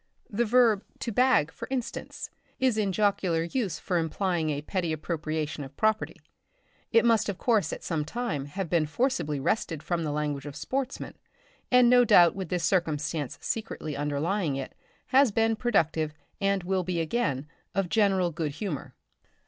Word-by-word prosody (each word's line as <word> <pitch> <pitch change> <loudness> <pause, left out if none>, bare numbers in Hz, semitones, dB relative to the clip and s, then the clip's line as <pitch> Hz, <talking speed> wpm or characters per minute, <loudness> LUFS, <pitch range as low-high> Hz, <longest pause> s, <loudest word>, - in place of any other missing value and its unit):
The 235 +3 +1
verb 225 -3 +4 0.2
"to 235 - -2
bag," 250 - +3
for - - -8
instance, 285 +3 -4 0.3
is 260 -3 +3
in 210 -3 +1
jocular 190 -4 +1
use 200 +2 -2
for 180 -3 -1
implying 165 0 -1
a 145 -1 -2
petty 175 0 -2
appropriation 155 -1 -3
of 135 0 -11
property. 215 0 +1 0.8
It 230 0 +5
must 225 -2 +3
of 195 - -3
course 220 -3 +2
at - - -6
some 160 -3 -1
time 155 - -3
have 190 +5 -4
been 160 -1 +1
forcibly 160 - 0
wrested 160 0 -1
from 170 -2 -1
the 155 - -2
language 145 -1 -2
of 145 - -7
sportsmen, 270 0 -3 0.6
and 250 -1 +6
no 245 0 +7
doubt 175 -7 +6
with 190 -4 -5
this 180 -1 -1
circumstance 155 -5 0
secretly 210 -9 -3
underlying 150 +3 -1
it, 135 -1 -5 0.4
has 265 -2 +5
been 225 +1 +2
productive, 165 -10 +1 0.2
and 195 -2 +1
will 185 +1 0
be 175 -1 -2
again, 155 - -1 0.3
of 195 -1 +1
general 195 -3 +2
good 155 -2 -3
humour. 165 -3 -5
180 Hz, 165 wpm, -28 LUFS, 155-225 Hz, 0.8 s, no